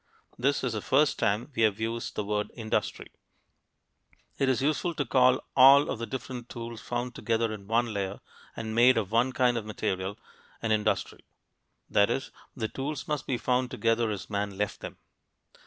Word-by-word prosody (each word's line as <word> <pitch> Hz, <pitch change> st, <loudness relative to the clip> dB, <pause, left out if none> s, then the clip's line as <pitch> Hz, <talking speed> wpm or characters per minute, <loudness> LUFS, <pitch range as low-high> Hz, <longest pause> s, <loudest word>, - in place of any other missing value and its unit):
This 135 Hz, +3 st, 0 dB
is 125 Hz, -3 st, -1 dB
the 105 Hz, -, -3 dB
first 145 Hz, +6 st, +2 dB
time 110 Hz, +5 st, 0 dB
we 115 Hz, -, 0 dB
have 110 Hz, -2 st, +3 dB
used 115 Hz, +1 st, -3 dB
the 105 Hz, -, -1 dB
word 105 Hz, 0 st, -1 dB
"industry." 110 Hz, -2 st, -2 dB, 1.3 s
It 135 Hz, -, +2 dB
is 130 Hz, -, +2 dB
useful 155 Hz, +4 st, 0 dB
to 145 Hz, -, -1 dB
call 125 Hz, +2 st, +4 dB
all 140 Hz, +2 st, +7 dB
of -, -, -4 dB
the 115 Hz, -, -4 dB
different 125 Hz, -2 st, -6 dB
tools 115 Hz, -1 st, -7 dB
found 120 Hz, 0 st, -3 dB
together 115 Hz, -1 st, 0 dB
in 100 Hz, -2 st, -9 dB
one 115 Hz, +1 st, +1 dB
layer 100 Hz, -1 st, -3 dB, 0.4 s
and 110 Hz, -1 st, -5 dB
made 120 Hz, +2 st, +6 dB
of 105 Hz, -3 st, -1 dB
one 120 Hz, +3 st, +3 dB
kind 125 Hz, -1 st, +2 dB
of 110 Hz, -, -9 dB
material 95 Hz, -1 st, -3 dB, 0.4 s
an 115 Hz, -, -2 dB
industry; 105 Hz, -3 st, 0 dB, 0.7 s
that 100 Hz, 0 st, +3 dB
is, 135 Hz, -1 st, -2 dB, 0.2 s
the 110 Hz, -4 st, -2 dB
tools 135 Hz, +4 st, -5 dB
must 150 Hz, -3 st, -2 dB
be 125 Hz, -, 0 dB
found 125 Hz, +1 st, 0 dB
together 115 Hz, -3 st, +1 dB
as 105 Hz, -3 st, -4 dB
men 100 Hz, -1 st, -3 dB
left 105 Hz, +1 st, -2 dB
them. -, -, -8 dB
115 Hz, 180 wpm, -28 LUFS, 110-130 Hz, 1.3 s, all